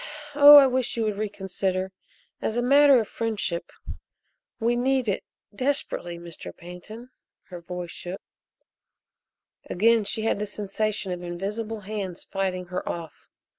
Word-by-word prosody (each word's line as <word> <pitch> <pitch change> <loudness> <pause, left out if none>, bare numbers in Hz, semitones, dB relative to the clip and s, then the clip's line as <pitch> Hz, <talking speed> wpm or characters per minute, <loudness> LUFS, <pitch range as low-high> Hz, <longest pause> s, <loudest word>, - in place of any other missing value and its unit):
Oh, 290 +1 +10
I 285 -1 +10
wish 255 -2 0
you 230 - +1
would 210 -2 -2
reconsider 190 -2 -2 0.5
as 220 - -2
a 240 - +1
matter 280 +1 +6
of 220 - -2
friendship. 210 -7 -3 0.9
We 235 +1 +1
need 260 0 +1
it 200 - -1 0.3
desperately, 255 -8 -2
Mr. 170 -1 -10
Pantin!" 215 +8 -11 0.4
Her 175 -2 -8
voice 175 0 -6
shook. 180 +2 -7 1.5
Again 225 +4 +3
she 220 +2 -1
had 225 - 0
the 210 - -2
sensation 205 -1 -2
of 180 0 -4
invisible 205 +5 -4
hands 195 -3 -5
fighting 185 -2 -3
her 180 - -3
off. 165 -2 -7
210 Hz, 135 wpm, -25 LUFS, 180-230 Hz, 1.5 s, Oh